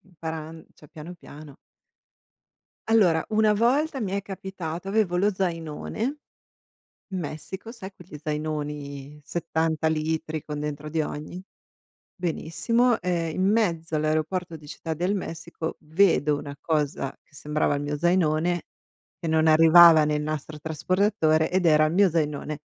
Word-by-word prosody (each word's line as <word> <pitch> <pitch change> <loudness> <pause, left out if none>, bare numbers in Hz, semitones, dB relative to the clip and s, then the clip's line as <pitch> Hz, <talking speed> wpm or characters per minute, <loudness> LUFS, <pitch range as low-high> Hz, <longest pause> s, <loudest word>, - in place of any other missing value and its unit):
imparan 160 -3 -8
cioè, 150 - -17
piano, 165 +5 -9
piano. 150 -3 -13 1.3
Allora, 190 -8 +4
una 215 0 +4
volta 270 +7 +1
mi 200 -4 -2
è 200 0 -1
capitato, 190 -3 -6
avevo 195 -3 +1
lo 205 +3 +2
zainone 165 -3 -4 1.1
in 190 -2 -3
Messico, 175 +6 -7
sai 195 -5 -9
quegli 180 -4 -12
zainoni, 150 -2 -4
70 160 -1 -1
litri 155 0 -2
con 150 0 -6
dentro 150 0 -5
di 160 +1 0
ogni? 155 +4 -6 0.7
Benissimo, 225 +7 0
ehm, 170 -2 -1
in 185 - +1
mezzo 170 -7 +1
all'aeroporto 155 +3 -1
di 150 - -15
Città 160 +2 -6
del 180 +5 0
Messico 165 -3 -5
vedo 155 -2 +3
una 145 0 -7
cosa 150 -4 -1
sembrava 150 0 -1
il 140 - -3
mio 145 +1 -2
zainone, 175 0 +1 0.6
che 170 - -3
non 160 0 +3
arrivava 165 +1 +8
nel 150 0 0
nastro 155 0 -4
trasportatore, 160 +1 +1
ed 185 0 0
era 155 -2 +5
il 155 - 0
mio 195 +1 +4
zainone. 150 -2 -2
160 Hz, 135 wpm, -25 LUFS, 155-185 Hz, 1.3 s, arrivava